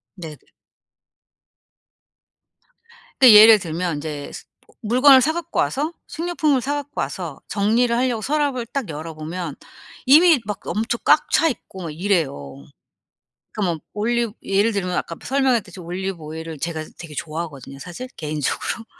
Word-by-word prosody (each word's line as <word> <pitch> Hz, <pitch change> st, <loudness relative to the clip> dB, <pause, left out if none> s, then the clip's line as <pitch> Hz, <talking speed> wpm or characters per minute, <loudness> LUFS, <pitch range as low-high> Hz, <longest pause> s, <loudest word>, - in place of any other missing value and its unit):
네네. 160 Hz, -5 st, -8 dB, 2.8 s
근데 250 Hz, -4 st, +9 dB
예를 215 Hz, 0 st, +9 dB
들면 170 Hz, -2 st, -3 dB
이제 145 Hz, -1 st, -6 dB
스 -, -, -9 dB, 0.2 s
뭐 -, -, -25 dB
물건을 260 Hz, +4 st, +6 dB
사 315 Hz, +5 st, +1 dB
갖고 340 Hz, 0 st, -4 dB
와서 300 Hz, +5 st, 0 dB
식료품을 310 Hz, -5 st, 0 dB
사 285 Hz, +3 st, -2 dB
갖고 290 Hz, -, -4 dB
와서 145 Hz, +2 st, -5 dB
정리를 230 Hz, +4 st, +2 dB
하려고 245 Hz, -3 st, 0 dB
서랍을 285 Hz, -4 st, -1 dB
딱 270 Hz, -4 st, -4 dB
열어보면 155 Hz, +1 st, -6 dB, 0.5 s
이미 310 Hz, +2 st, +7 dB
막 210 Hz, -1 st, -4 dB
엄청 225 Hz, +2 st, -1 dB
꽉 300 Hz, 0 st, +4 dB
차 325 Hz, -, +4 dB
있고 190 Hz, -7 st, -8 dB
막 160 Hz, -, -5 dB
이래요. 140 Hz, -, -2 dB, 0.9 s
그러니까 215 Hz, -, -4 dB
뭐 -, -, -8 dB
올리브 230 Hz, +1 st, -1 dB
예를 200 Hz, +4 st, +1 dB
들면 185 Hz, -3 st, -2 dB
아까 170 Hz, -, -3 dB
프 -, -, -13 dB
설명했듯이 255 Hz, -9 st, 0 dB
올리브 185 Hz, +2 st, -4 dB
오일을 160 Hz, 0 st, -7 dB
제가 160 Hz, 0 st, -4 dB
되게 165 Hz, -3 st, -10 dB
좋아하거든요 155 Hz, -4 st, -6 dB
사실 215 Hz, -, -8 dB
개인적으로. 155 Hz, -, -3 dB
200 Hz, 315 characters per minute, -21 LUFS, 160-255 Hz, 2.8 s, 근데